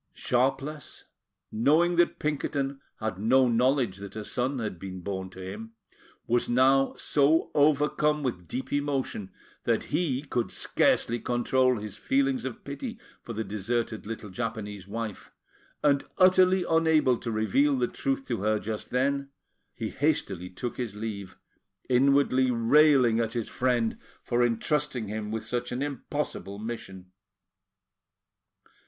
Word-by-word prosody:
Sharpless, 135 +4 -1 0.5
knowing 155 +10 +3
that 175 - +3
Pinkerton 140 -2 -2 0.2
had 110 -4 -3
no 130 +5 +4
knowledge 120 -3 +2
that 100 +1 -9
a 110 -1 -5
son 130 +5 -1
had 110 -7 -4
been 95 0 -7
born 95 0 -4
to 95 - -13
him, 110 +4 -7 0.5
was 120 +1 +1
now 135 +2 +4
so 150 +3 +2
overcome 150 +1 +2
with 90 -10 -3
deep 130 - -5
emotion 140 -8 -2 0.3
that - - 0
he 145 -6 0
could 125 -5 -2
scarcely 120 +1 +1
control 125 +1 +2
his 105 -1 -7
feelings 270 -2 +1
of 215 - -6
pity 235 +3 -6 0.2
for 120 - -7
the 110 +1 -2
deserted 110 +1 -2
little 110 -2 -6
Japanese 105 -3 -5
wife; 110 -1 -5 0.5
and, 140 -2 +3
utterly 185 0 +5
unable 160 -5 +4
to 120 - -5
reveal 120 +7 +2
the 125 -1 +1
truth 275 0 -2
to - - -2
her 110 +1 +2
just 105 +2 -5
then, 140 +2 0 0.5
he 110 -3 -3
hastily 135 - -1
took 120 +7 -5
his 115 -5 -4
leave, 105 -3 -6 0.5
inwardly 130 0 +4
railing 125 0 +5
at 115 -1 -1
his 120 -3 -3
friend 120 -3 0 0.2
for 120 0 +1
entrusting 120 0 0
him 105 0 -4
with 110 +1 -4
such 125 0 -3
an 125 +3 -2
impossible 140 -8 -4
mission. 100 -5 -7
125 Hz, 135 wpm, -28 LUFS, 110-145 Hz, 0.5 s, utterly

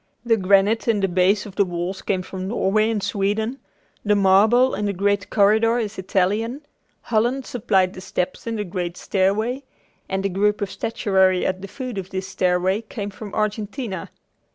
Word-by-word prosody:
The 230 -1 +4
granite 200 +3 +3
in 225 -3 +2
the 195 - +2
base 185 +3 +2
of 200 -2 -10
the 200 - +5
walls 180 +1 -4
came 185 -2 -1
from 185 0 -6
Norway 215 0 +1
and 215 -3 -1
Sweden, 220 +6 -1 0.4
the 210 -1 +3
marble 210 +6 +4
in 210 - -2
the 200 - 0
great 200 0 0
corridor 220 +3 +3
is 215 -3 -3
Italian; 210 +9 -1 0.4
Holland 240 +4 0
supplied 195 -6 +1
the 185 - -9
steps 185 +3 -3
in 230 - -2
the 210 - -2
great 180 -2 -4
stairway, 215 +7 0 0.5
and 190 0 -1
the 195 - +1
group 205 +3 +1
of 200 -1 -3
statuary 190 -5 +1
at 185 0 -1
the 195 - -6
foot 250 -1 -5
of 190 -1 -7
this 190 0 -4
stairway 185 +2 +1
came 210 -2 -6
from 205 +1 -9
Argentina. 215 +1 -3
200 Hz, 175 wpm, -22 LUFS, 190-220 Hz, 0.5 s, the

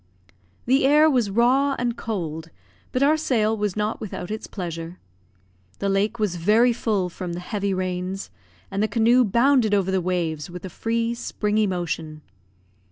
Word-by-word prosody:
The 265 +3 +3
air 300 +3 +6
was 245 -6 +1
raw 255 +6 +3
and 240 -1 -1
cold, 165 -9 -4 0.4
but 255 - +1
our 305 +3 +4
sail 225 -8 +1
was 210 -3 -2
not 210 +1 -2
without 185 -3 -6
its 220 - -5
pleasure. 170 -2 -6 0.8
The 200 - -1
lake 200 +4 +1
was 205 -5 -1
very 220 +8 +4
full 210 -5 0
from 180 0 -6
the 175 - -4
heavy 200 +2 -2
rains, 185 +1 -3 0.4
and 195 +1 -1
the 215 - +2
canoe 235 +3 +4
bounded 235 0 +3
over 190 -1 +1
the 190 -1 +1
waves 170 -4 -2
with 180 +1 -8
a 185 - -7
free, 230 +4 -1
springy 215 -2 -1
motion. 165 -4 -4
210 Hz, 165 wpm, -23 LUFS, 180-235 Hz, 0.8 s, air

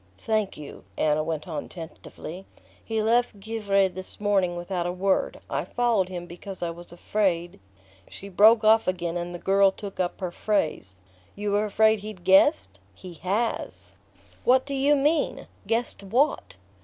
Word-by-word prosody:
"Thank 215 - -1
you." 150 -2 -10
Anna 150 0 +2
went 160 0 -4
on 155 -4 -5
tentatively: 170 +1 -9 0.4
"He 220 -1 -2
left 235 -1 +1
Givre 200 -2 +1
this 185 0 -9
morning 195 -4 +1
without 175 0 -3
a - - -1
word. 190 +2 0
I - - -2
followed 230 -6 0
him 175 -2 -6
because 175 +2 -8
I 170 - -1
was 170 +1 -10
afraid..." 175 - -1 0.5
She 200 - -9
broke 215 +4 +5
off 220 +1 +5
again 175 -2 -2
and 175 0 -3
the 175 - -6
girl 195 +2 +4
took 195 0 -9
up 180 -1 -1
her 180 -3 -3
phrase. 155 - -2 0.4
"You 205 0 -3
were 205 +1 +2
afraid 220 +1 +3
he'd 205 -3 -9
guessed? 95 - +4 0.2
He 180 - -10
HAS..." 200 +8 -3 0.5
"What 255 +1 +4
do 280 - -5
you 275 +2 +3
mean 295 +3 0 0.2
guessed 230 -1 +1
what?" 240 - 0
195 Hz, 160 wpm, -25 LUFS, 175-215 Hz, 0.5 s, broke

